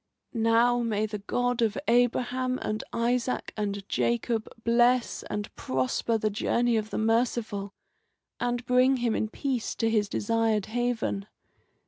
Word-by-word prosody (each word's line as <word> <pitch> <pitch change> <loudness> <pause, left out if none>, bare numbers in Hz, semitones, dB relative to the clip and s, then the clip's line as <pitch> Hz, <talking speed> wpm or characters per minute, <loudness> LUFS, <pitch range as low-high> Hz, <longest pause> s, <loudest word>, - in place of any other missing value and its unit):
"Now 230 +1 +3
may 215 -2 0
the 210 -1 -5
God 245 +4 -1
of 220 -2 +1
Abraham 245 +2 +2
and 215 0 -2
Isaac 240 +2 -1
and 200 -2 -3
Jacob 235 -1 0 0.2
bless 240 +1 +3
and 210 0 -4
prosper 130 - 0
the 215 -1 0
journey 235 +3 +1
of 215 -1 -1
the - - -4
merciful, 220 -3 0 0.6
and 245 0 -1
bring 255 +2 +4
him 240 -2 0
in 220 - 0
peace 260 -2 -2
to 225 -1 0
his 210 -2 +1
desired 225 -1 +1
haven. 225 -3 -2
230 Hz, 135 wpm, -27 LUFS, 215-245 Hz, 0.6 s, bring